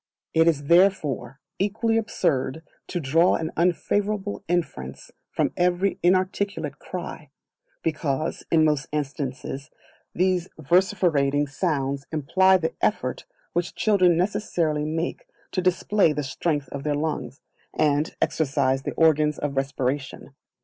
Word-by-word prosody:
It 165 +1 +4
is 150 -4 +2
therefore 155 -6 +2 0.2
equally 220 +3 +1
absurd 155 -8 -1 0.2
to 175 - -3
draw 165 +4 +3
an 160 0 -3
unfavourable 205 +4 0
inference 135 - -3 0.2
from - - 0
every 180 +2 +1
inarticulate 185 -4 0
cry; 170 -4 -7 0.5
because, 155 -2 -2
in 160 -1 +4
most 150 -3 +1
instances, 140 -2 -4 0.5
these 180 0 +1
vociferating 155 -4 +2
sounds 140 -3 -2
imply 185 +5 +4
the 165 -3 -2
effort - - -1 0.3
which 175 0 -2
children 185 -5 +3
necessarily 175 -6 0
make 160 +2 -3 0.2
to 185 - 0
display 185 -1 +2
the 150 0 -2
strength 145 +1 -2
of 140 - -5
their 150 0 0
lungs, 150 -2 -3 0.4
and 150 0 +1
exercise 135 -3 +1
the - - -4
organs 155 -2 +3
of 145 -1 -3
respiration. 135 0 -2
160 Hz, 120 wpm, -25 LUFS, 140-180 Hz, 0.5 s, It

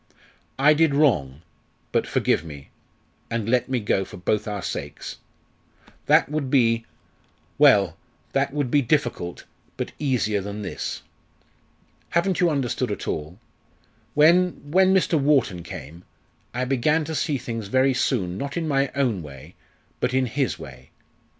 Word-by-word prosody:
I 145 +3 +6
did 150 -2 +3
wrong, 85 - +2 0.5
but - - +1
forgive - - +1
me, 70 -4 -11 0.6
and 115 -2 -2
let 125 +1 +1
me 130 -2 0
go 100 -2 0
for 90 - -10
both 105 +4 -1
our 100 -3 -4
sakes' - - -5 0.9
that - - +5
would 150 -2 -2
be 115 -4 +2 0.7
well! - - +5 0.4
that 135 0 +1
would 140 -3 -2
be 145 - +4
difficult, 120 - -1 0.3
but - - -3
easier 115 -8 0
than 105 +2 -6
this! - - -5 1.1
Haven't 170 +2 +1
you 175 - +4
understood 140 -6 -1
at - - -5
all? 80 +3 -4 0.8
When 165 0 +3
when 190 +2 +5
Mr. 180 -4 +3
Wharton 135 -11 +2
came, 85 +1 -9 0.5
I 125 +1 -2
began 150 +5 +1
to 160 - -5
see 150 -2 0
things 115 -4 -5
very 130 +5 +3
soon, 100 -8 -1
not 140 +2 -4
in 165 -2 -1
my 140 -2 +1
own 125 -9 +1
way, 70 -4 -11 0.5
but 125 +1 0
in 130 0 +3
his 130 +2 -1
way. 65 -3 -12
130 Hz, 145 wpm, -24 LUFS, 100-145 Hz, 1.1 s, I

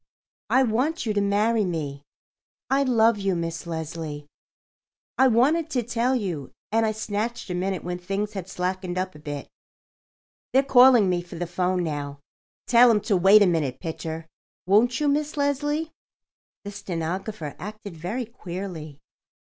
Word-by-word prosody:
"I 265 - +4
want 255 +7 0
you 215 - 0
to 205 - +1
marry 210 +3 +2
me. 150 -6 -3 0.7
I 275 +1 +4
love 230 -4 +3
you, 195 -2 0
Miss 165 0 -4
Leslie. 160 -2 -5 0.9
I 265 - +5
wanted 290 +8 +3
to 250 -6 0
tell 240 +3 0
you, 175 - -3 0.2
and 225 0 +2
I - - +1
snatched 220 0 -3
a - - -1
minute 185 +1 -2
when 180 0 -4
things 200 +3 -3
had 190 -2 -6
slackened 185 0 -3
up 185 0 -2
a 150 - -13
bit. 145 -2 -6 1.1
They're 265 +1 +5
calling 250 -5 +6
me 180 -1 +1
for 175 - -11
the 175 - -3
'phone 180 +1 0
now. 145 -3 -4 0.5
Tell 245 0 +6
'em 215 -3 +3
to 210 -1 +1
wait 195 +3 +7
a - - +5
minute, 160 -8 0
Pitcher. 160 -1 -5 0.4
Won't 220 +6 +3
you, 300 - +1
Miss 295 +2 0
Leslie?" 290 +3 0 0.7
The 205 - -6
stenographer 180 -2 -4
acted 210 -2 -8
very 195 +10 -4
queerly. 180 - -7
200 Hz, 155 wpm, -25 LUFS, 170-235 Hz, 1.1 s, wait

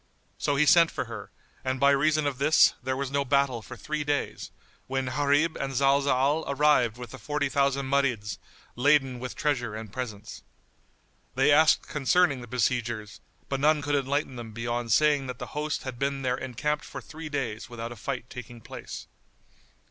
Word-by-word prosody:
So 145 - +1
he 145 +2 +4
sent 165 +2 +6
for - - -4
her, - - -8 0.3
and 130 0 -1
by 140 +1 +5
reason 155 +2 +2
of 140 -2 -2
this, 155 +3 +5
there 130 +1 -2
was 135 -1 -3
no 140 0 +1
battle 140 -3 +1
for - - -10
three 150 0 -3
days, 145 0 -2 0.4
when 135 0 -1
Gharib 145 +4 +2
and 135 -1 -3
Zalzal 140 +2 +3
arrived 140 -5 +3
with 125 -1 -8
the 130 - -9
forty 145 -1 -1
thousand 140 0 +1
Marids, 125 -7 0 0.4
laden 135 -1 +3
with 125 +1 -6
treasure 120 -7 -1
and 110 -2 -8
presents. 110 -5 -6 0.9
They - - +4
asked 155 +2 +5
concerning 150 -1 +2
the 120 - -9
besiegers, 120 -3 -2 0.3
but 135 - -2
none 150 +1 +3
could 145 +1 -1
enlighten 140 -1 0
them 115 -2 -8
beyond 120 +1 -3
saying 145 +1 +3
that 125 -1 -5
the - - -6
host 150 +1 -2
had 130 -2 -6
been 140 0 -1
there 125 -1 +1
encamped 135 +4 -2
for - - -7
three 160 0 -9
days 130 -6 -3
without 120 0 -6
a - - -7
fight 125 +2 -5
taking 120 -1 -9
place. - - -8
135 Hz, 180 wpm, -27 LUFS, 125-145 Hz, 0.9 s, sent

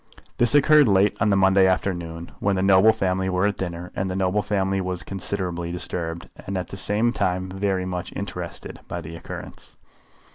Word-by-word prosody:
This 120 +2 +4
occurred 150 0 +6
late 100 0 +3
on 105 - +2
the 100 - +3
Monday 95 0 +5
afternoon, 85 -3 -2
when 100 -1 +1
the 95 - 0
noble 95 +3 +6
family 95 -3 -1
were 90 +1 +1
at 105 -1 +1
dinner, 90 -1 -5
and 95 0 -2
the 90 - -3
noble 95 +2 +1
family 95 -1 0
was 90 -1 -3
considerably 90 -3 -3
disturbed, 85 -1 -4 0.2
and 95 0 -2
at 90 - -4
the - - -7
same 105 +5 +1
time 95 -3 -1
very 95 -1 -1
much 90 -1 -4
interested, - - -6
by 85 - -4
the 80 0 -8
occurrence. 85 - -9
95 Hz, 185 wpm, -23 LUFS, 90-100 Hz, 0.2 s, occurred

